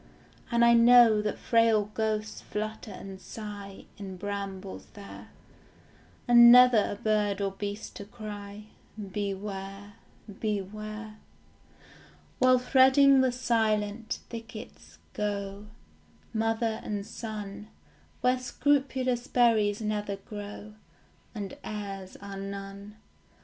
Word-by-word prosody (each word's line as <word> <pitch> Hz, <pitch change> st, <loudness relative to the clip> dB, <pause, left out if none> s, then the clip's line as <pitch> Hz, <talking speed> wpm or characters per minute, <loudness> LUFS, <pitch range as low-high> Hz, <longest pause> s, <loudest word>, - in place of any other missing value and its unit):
And 235 Hz, -1 st, +4 dB
I 235 Hz, -, +6 dB
know 235 Hz, -2 st, +7 dB
that 210 Hz, 0 st, -2 dB
frail 225 Hz, -3 st, +2 dB
ghosts 215 Hz, -1 st, -2 dB
flutter 215 Hz, +1 st, -5 dB
and 190 Hz, -1 st, -9 dB
sigh 205 Hz, -3 st, -8 dB
In 190 Hz, -2 st, -7 dB
brambles 195 Hz, -1 st, -6 dB
there, 200 Hz, -1 st, -11 dB, 1.0 s
And 235 Hz, 0 st, +9 dB
never 250 Hz, -3 st, +8 dB
a -, -, -3 dB
bird 210 Hz, -1 st, 0 dB
or 200 Hz, -1 st, -1 dB
beast 205 Hz, +2 st, -6 dB
to 200 Hz, -, -8 dB
cry 210 Hz, -2 st, -8 dB, 0.3 s
Beware, 200 Hz, 0 st, -5 dB, 0.5 s
beware, 215 Hz, +1 st, -4 dB, 1.2 s
While 255 Hz, 0 st, +6 dB
threading 265 Hz, +2 st, +5 dB
the 260 Hz, -1 st, +2 dB
silent 225 Hz, -3 st, -1 dB
thickets 225 Hz, 0 st, -10 dB, 0.2 s
go 200 Hz, 0 st, -3 dB, 0.7 s
Mother 225 Hz, 0 st, 0 dB
and 205 Hz, -1 st, -4 dB
son, 210 Hz, -2 st, -7 dB, 0.5 s
Where 250 Hz, 0 st, +2 dB
scrupulous 255 Hz, -1 st, 0 dB
berries 225 Hz, -5 st, +3 dB
never 210 Hz, -1 st, -2 dB
grow, 205 Hz, +1 st, -9 dB, 0.6 s
And 200 Hz, -3 st, -5 dB
airs 195 Hz, -3 st, -6 dB
are 200 Hz, -1 st, -8 dB
none. 200 Hz, +1 st, -7 dB
210 Hz, 100 wpm, -28 LUFS, 200-230 Hz, 1.2 s, And